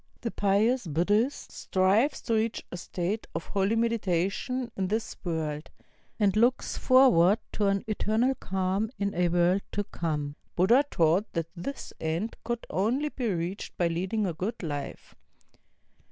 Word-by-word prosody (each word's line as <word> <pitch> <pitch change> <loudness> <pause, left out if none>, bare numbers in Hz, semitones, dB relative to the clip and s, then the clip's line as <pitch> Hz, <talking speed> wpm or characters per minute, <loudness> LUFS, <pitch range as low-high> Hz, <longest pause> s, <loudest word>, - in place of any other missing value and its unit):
The 230 - -2
pious 205 +3 +2
Buddhist 205 - +1
strives 200 +9 +1
to 230 - -1
reach 220 0 0
a 180 - -5
state 185 +5 -3
of 165 - -3
holy 200 +2 0
meditation 230 +2 0
in 190 -1 -1
this 220 +3 -2
world, 155 -4 -3 0.5
and 205 -2 +3
looks 240 +4 +2
forward 230 -8 +5
to 205 - 0
an 195 0 +1
eternal 220 +4 +1
cahn 190 -1 -1
in 200 0 -1
a 180 0 +2
world 175 +3 +3
to 205 - 0
come. 150 -6 -3 0.2
Buddha 230 +10 +5
taught 170 +6 +2
that 165 -1 -2
this 225 +11 -6
end 165 +8 -2
could 235 -1 -3
only 245 +10 +1
be 255 -4 -3
reached 175 +3 -4
by 175 -1 +2
leading 190 +6 -1
a 180 - -1
good 195 +7 -4
life. 145 -3 -5
195 Hz, 150 wpm, -28 LUFS, 175-225 Hz, 0.5 s, forward